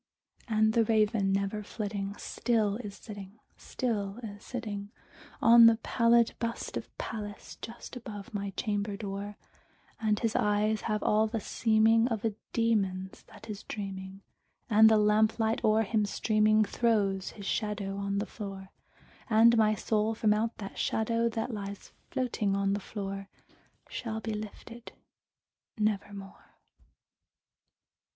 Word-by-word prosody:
And 220 Hz, -1 st, +3 dB
the 230 Hz, -1 st, +4 dB
Raven, 215 Hz, -2 st, +2 dB
never 200 Hz, +2 st, 0 dB
flitting, 200 Hz, -2 st, -4 dB
still 215 Hz, -4 st, 0 dB
is 205 Hz, -5 st, -7 dB
sitting, 205 Hz, -1 st, -10 dB, 0.2 s
still 210 Hz, -5 st, -3 dB
is 205 Hz, -2 st, -8 dB
sitting 210 Hz, -5 st, -5 dB, 0.5 s
On 230 Hz, 0 st, +9 dB
the 230 Hz, -, +6 dB
pallid 235 Hz, -1 st, +3 dB
bust 230 Hz, 0 st, -3 dB
of -, -, -4 dB
Pallas 205 Hz, -2 st, -6 dB
just 235 Hz, +3 st, -8 dB
above 215 Hz, -5 st, -8 dB
my 200 Hz, -1 st, -2 dB
chamber 205 Hz, -1 st, -1 dB
door; 200 Hz, 0 st, -5 dB, 0.6 s
And 215 Hz, -2 st, +1 dB
his 225 Hz, 0 st, -1 dB
eyes 210 Hz, +1 st, +2 dB
have 210 Hz, -1 st, 0 dB
all 215 Hz, +1 st, +3 dB
the 225 Hz, +1 st, -2 dB
seeming 225 Hz, +2 st, +3 dB
of 225 Hz, -3 st, -2 dB
a 220 Hz, -, +1 dB, 0.2 s
demon's 195 Hz, -5 st, 0 dB
that 220 Hz, -, -14 dB
is 210 Hz, -1 st, -6 dB
dreaming, 195 Hz, -1 st, -6 dB, 0.5 s
And 220 Hz, +1 st, +8 dB
the 220 Hz, -, +5 dB
lamplight 215 Hz, +2 st, +2 dB
o'er 220 Hz, +1 st, +4 dB
him 215 Hz, 0 st, +1 dB
streaming 215 Hz, +1 st, +3 dB
throws 200 Hz, -4 st, +1 dB
his 200 Hz, -, -8 dB
shadow 205 Hz, -2 st, -2 dB
on 200 Hz, 0 st, -2 dB
the 205 Hz, -, 0 dB
floor; 195 Hz, -3 st, -8 dB, 0.6 s
And 230 Hz, +1 st, +6 dB
my 215 Hz, -1 st, +4 dB
soul 215 Hz, +1 st, 0 dB
from 215 Hz, -1 st, +3 dB
out 225 Hz, +2 st, -1 dB
that 195 Hz, -2 st, -7 dB
shadow 230 Hz, +1 st, +1 dB
that 225 Hz, +2 st, -3 dB
lies 200 Hz, -1 st, -6 dB, 0.2 s
floating 225 Hz, -6 st, 0 dB
on 195 Hz, 0 st, +1 dB
the 205 Hz, -, -1 dB
floor 195 Hz, -1 st, -6 dB, 0.6 s
Shall 220 Hz, -2 st, -4 dB
be 220 Hz, 0 st, -4 dB
lifted 215 Hz, +2 st, -8 dB, 0.8 s
nevermore! 200 Hz, -2 st, -3 dB
215 Hz, 135 wpm, -30 LUFS, 200-225 Hz, 0.8 s, On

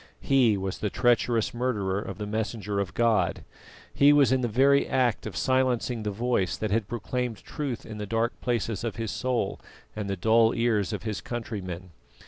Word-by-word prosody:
He 125 Hz, -6 st, +3 dB
was 95 Hz, -1 st, -4 dB
the 105 Hz, -, -1 dB
treacherous 120 Hz, -1 st, +2 dB
murderer 105 Hz, -6 st, -1 dB
of 95 Hz, -3 st, -7 dB
the 105 Hz, -, -4 dB
Messenger 105 Hz, -1 st, -2 dB
of 95 Hz, -1 st, -3 dB
God; 115 Hz, -3 st, +2 dB, 0.5 s
he 140 Hz, +1 st, +6 dB
was 145 Hz, -3 st, +5 dB
in 130 Hz, -1 st, +2 dB
the 120 Hz, -, +1 dB
very 135 Hz, +5 st, +4 dB
act 125 Hz, -5 st, +1 dB
of 100 Hz, -, -7 dB
silencing 125 Hz, 0 st, +1 dB
the 105 Hz, -, -2 dB
Voice 105 Hz, -3 st, 0 dB
that 110 Hz, -2 st, -2 dB
had 110 Hz, -1 st, +1 dB
proclaimed 120 Hz, 0 st, -3 dB
truth 140 Hz, -6 st, -5 dB
in 110 Hz, -1 st, -8 dB
the 105 Hz, -, -4 dB
dark 115 Hz, +2 st, 0 dB
places 115 Hz, -4 st, -1 dB
of 115 Hz, -, -3 dB
his 115 Hz, -3 st, -3 dB
soul 125 Hz, +6 st, -1 dB, 0.4 s
and 105 Hz, -2 st, -4 dB
the 100 Hz, -, -2 dB
dull 115 Hz, +4 st, +4 dB
ears 110 Hz, -5 st, +1 dB
of -, -, -4 dB
his 110 Hz, -3 st, -3 dB
countrymen. 95 Hz, -7 st, -6 dB
115 Hz, 185 wpm, -27 LUFS, 105-125 Hz, 0.5 s, he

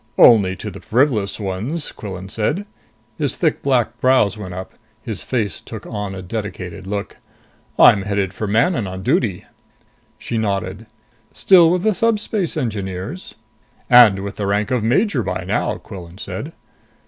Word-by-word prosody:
"Only 100 Hz, -6 st, +6 dB
to 105 Hz, -, -6 dB
the 95 Hz, -, -10 dB
frivolous 110 Hz, -, +1 dB
ones," 105 Hz, -, -3 dB
Quillan 95 Hz, -2 st, -7 dB
said. 145 Hz, -, -2 dB, 0.5 s
His 145 Hz, -3 st, 0 dB
thick 160 Hz, -4 st, 0 dB
black 120 Hz, -4 st, +1 dB
brows 130 Hz, -6 st, +3 dB
went 95 Hz, -4 st, -7 dB
up. 95 Hz, 0 st, -7 dB, 0.3 s
His 110 Hz, -9 st, -5 dB
face 105 Hz, -, -2 dB
took -, -, -9 dB
on 105 Hz, -2 st, -5 dB
a 95 Hz, -, -7 dB
dedicated 95 Hz, -2 st, -6 dB
look. 100 Hz, 0 st, -4 dB, 0.6 s
"I'm 100 Hz, -, +7 dB
headed 100 Hz, -1 st, -1 dB
for 105 Hz, -, -4 dB
Manon 115 Hz, -, +1 dB
on 95 Hz, 0 st, -6 dB
duty." 110 Hz, -, 0 dB, 0.7 s
She 115 Hz, -, -3 dB
nodded. 100 Hz, 0 st, -2 dB, 0.4 s
"Still 175 Hz, -4 st, +6 dB
with 180 Hz, +1 st, +1 dB
the 220 Hz, -, +3 dB
Subspace 210 Hz, -5 st, 0 dB
Engineers?" 105 Hz, -, -4 dB, 0.6 s
"And 110 Hz, -6 st, +7 dB
with 100 Hz, +1 st, -6 dB
the 100 Hz, -, -2 dB
rank 100 Hz, +2 st, 0 dB
of 125 Hz, -2 st, +1 dB
major 140 Hz, -, +2 dB
by 95 Hz, -3 st, -3 dB
now," 95 Hz, +4 st, -1 dB
Quillan 90 Hz, -2 st, -11 dB
said. -, -, -6 dB
105 Hz, 150 wpm, -20 LUFS, 95-130 Hz, 0.7 s, I'm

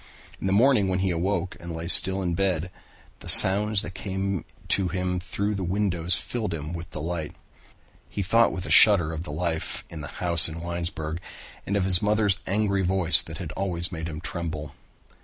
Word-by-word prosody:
In -, -, -3 dB
the -, -, -1 dB
morning 110 Hz, 0 st, +2 dB
when 95 Hz, -1 st, -1 dB
he 95 Hz, 0 st, -1 dB
awoke 90 Hz, +1 st, -3 dB
and 85 Hz, -1 st, -8 dB
lay 80 Hz, +1 st, -7 dB
still 95 Hz, +2 st, +6 dB
in 85 Hz, -1 st, -2 dB
bed, 90 Hz, -1 st, -2 dB, 0.5 s
the -, -, -8 dB
sounds 105 Hz, +2 st, +7 dB
that 95 Hz, -, -8 dB
came 95 Hz, 0 st, -4 dB
in -, -, -15 dB, 0.2 s
to 95 Hz, -2 st, 0 dB
him 90 Hz, 0 st, -3 dB
through 100 Hz, +3 st, -4 dB
the 100 Hz, -2 st, -5 dB
windows 90 Hz, -2 st, -1 dB
filled 110 Hz, -8 st, -5 dB
him 75 Hz, +1 st, -7 dB
with 85 Hz, 0 st, -8 dB
delight. 80 Hz, -1 st, -6 dB, 0.7 s
He 100 Hz, -, -5 dB
thought 115 Hz, +5 st, +2 dB
with 90 Hz, -, -7 dB
a -, -, -6 dB
shudder 90 Hz, -7 st, +5 dB
of 80 Hz, +2 st, -7 dB
the 75 Hz, -, -8 dB
life 80 Hz, +1 st, -4 dB
in 80 Hz, -, -8 dB
the 75 Hz, -, -8 dB
house 85 Hz, 0 st, +4 dB
in 80 Hz, +1 st, -8 dB
Winesburg 85 Hz, -2 st, -5 dB, 0.5 s
and 100 Hz, -, -2 dB
of 95 Hz, -, -1 dB
his 90 Hz, -2 st, +3 dB
mother's 105 Hz, -2 st, 0 dB
angry 100 Hz, 0 st, -1 dB
voice 90 Hz, -3 st, +3 dB
that 80 Hz, 0 st, -10 dB
had 90 Hz, -5 st, -8 dB
always 90 Hz, 0 st, -2 dB
made 80 Hz, -1 st, -6 dB
him 80 Hz, -1 st, -8 dB
tremble. 80 Hz, -4 st, -6 dB
90 Hz, 195 wpm, -24 LUFS, 85-100 Hz, 0.7 s, sounds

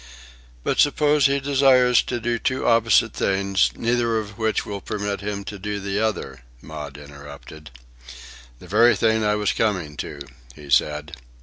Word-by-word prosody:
"But -, -, -1 dB
suppose 145 Hz, 0 st, +3 dB
he 140 Hz, 0 st, 0 dB
desires 130 Hz, -3 st, +4 dB
to 120 Hz, -, -4 dB
do 120 Hz, 0 st, -2 dB
two 130 Hz, -, -2 dB
opposite 115 Hz, -3 st, +3 dB
things, 95 Hz, 0 st, +1 dB
neither 115 Hz, -1 st, 0 dB
of 105 Hz, -2 st, -5 dB
which 110 Hz, 0 st, -1 dB
will 100 Hz, -1 st, -6 dB
permit 105 Hz, -1 st, -4 dB
him 100 Hz, 0 st, -4 dB
to 100 Hz, 0 st, -8 dB
do 105 Hz, +1 st, -4 dB
the 100 Hz, +1 st, -3 dB
other?" 85 Hz, -, -3 dB, 0.2 s
Maud 75 Hz, -2 st, -9 dB
interrupted. 70 Hz, 0 st, -12 dB, 0.9 s
"The -, -, -15 dB
very 115 Hz, +6 st, +4 dB
thing 110 Hz, -1 st, +1 dB
I 105 Hz, 0 st, +1 dB
was 105 Hz, -1 st, 0 dB
coming 90 Hz, -9 st, -1 dB
to," 70 Hz, -, -7 dB, 0.3 s
he 75 Hz, -2 st, -12 dB
said. 75 Hz, +3 st, +1 dB
105 Hz, 160 wpm, -22 LUFS, 80-115 Hz, 0.9 s, desires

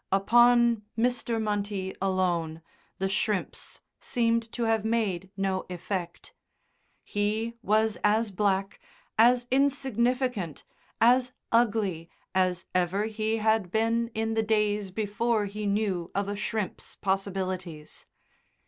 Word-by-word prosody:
Upon 235 Hz, +3 st, +5 dB, 0.2 s
Mr. 235 Hz, -1 st, +1 dB
Munty 205 Hz, -3 st, -2 dB
alone 175 Hz, -4 st, 0 dB, 0.3 s
the 195 Hz, -, 0 dB
shrimps 200 Hz, 0 st, -2 dB, 0.2 s
seemed 230 Hz, -1 st, 0 dB
to 240 Hz, -, -2 dB
have 225 Hz, -2 st, +1 dB
made 210 Hz, -5 st, -1 dB
no 195 Hz, -1 st, 0 dB
effect. 180 Hz, 0 st, -5 dB, 0.7 s
He 215 Hz, +3 st, -1 dB
was 220 Hz, 0 st, +2 dB
as 215 Hz, +1 st, +2 dB
black, 195 Hz, 0 st, 0 dB, 0.4 s
as 240 Hz, +2 st, +5 dB
insignificant, 255 Hz, -, 0 dB, 0.4 s
as 250 Hz, +2 st, +4 dB, 0.2 s
ugly 205 Hz, -8 st, +1 dB, 0.2 s
as 185 Hz, -1 st, +1 dB
ever 185 Hz, +3 st, +1 dB
he 220 Hz, 0 st, -1 dB
had 220 Hz, -3 st, +1 dB
been 230 Hz, +3 st, +1 dB
in 225 Hz, 0 st, -1 dB
the 225 Hz, -, +2 dB
days 210 Hz, -2 st, +1 dB
before 215 Hz, +2 st, 0 dB
he 205 Hz, +1 st, -4 dB
knew 200 Hz, -4 st, 0 dB
of 200 Hz, 0 st, 0 dB
a 205 Hz, -, -2 dB
shrimp's 210 Hz, -1 st, -4 dB
possibilities. 185 Hz, -4 st, -3 dB
210 Hz, 110 wpm, -28 LUFS, 190-230 Hz, 0.7 s, Upon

